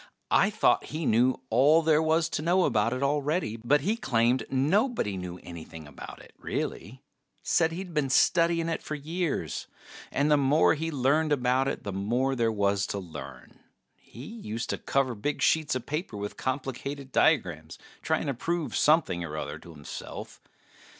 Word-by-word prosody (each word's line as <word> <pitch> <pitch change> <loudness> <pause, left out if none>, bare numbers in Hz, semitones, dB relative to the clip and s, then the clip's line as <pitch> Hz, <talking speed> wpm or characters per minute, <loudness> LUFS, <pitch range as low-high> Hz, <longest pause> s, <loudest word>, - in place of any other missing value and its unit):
I - - +5
thought - - +2
he 155 +1 -4
knew 125 +3 +3
all 145 +8 +5
there 155 -1 +4
was 160 +1 +2
to 155 - -2
know 180 +3 +3
about 110 +2 +2
it 130 +2 -2
already, 145 -2 0
but 135 +6 +2
he 205 +9 0
claimed 120 - +1
nobody 150 - +1
knew 90 -1 -6
anything 80 -2 -9
about 75 - -10
it, - - -18
really. 125 +6 -5 0.4
Said 160 - +2
he'd 180 +1 -6
been 150 -3 0
studying 165 +4 +3
it 165 - -2
for 155 - -5
years, 160 +3 -3 0.4
and 145 +2 +1
the 150 - +6
more 140 +3 +4
he 160 +1 -3
learned 150 +2 +1
about 130 -1 +2
it 135 - -3
the 100 - -4
more 120 +8 0
there 115 -2 +1
was 100 -1 +1
to - - -3
learn. 70 -9 -9 0.4
He 120 +4 -12
used 120 - -5
to - - -3
cover 135 -2 0
big 140 +7 -3
sheets 155 -4 +2
of 130 - -4
paper 150 - -4
with 100 0 -5
complicated 135 +1 -4
diagrams 85 - +1 0.2
trying - - 0
to 140 - -1
prove 165 +5 -2
something 150 - +3
or 75 -2 -5
other - - -5
to - - -14
himself. 75 -2 -9
135 Hz, 170 wpm, -28 LUFS, 110-155 Hz, 0.4 s, the